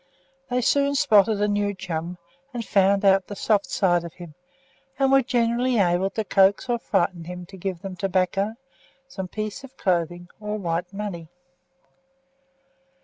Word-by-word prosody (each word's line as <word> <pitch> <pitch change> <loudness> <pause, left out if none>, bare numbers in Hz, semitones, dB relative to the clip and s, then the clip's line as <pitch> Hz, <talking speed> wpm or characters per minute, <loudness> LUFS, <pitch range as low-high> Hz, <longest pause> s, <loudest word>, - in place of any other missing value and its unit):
They 250 0 +1
soon 280 +3 +2
spotted 210 -4 +4
a 210 - +3
new 205 0 0
chum, 175 -2 -5 0.4
and 235 -2 -3
found 195 0 +3
out 195 -1 +4
the 205 - -7
soft 205 0 +1
side 175 -3 +2
of 170 - -8
him; 175 -3 -10 0.6
and 270 -1 +2
were 270 0 +6
generally 240 0 +1
able 185 -1 +2
to 220 - -3
coax 195 +1 +3
or 240 -1 0
frighten 175 -5 0
him 180 +1 -7
to 190 - -13
give 185 -2 -5
them 195 -1 -6
tobacco, 195 +3 0 0.5
some 190 -8 -6
piece 215 +6 -5
of 270 0 -13
clothing, 175 -1 -1
or 210 0 -3
white 175 -1 -2
money. 195 -5 -5
195 Hz, 155 wpm, -24 LUFS, 180-215 Hz, 0.6 s, were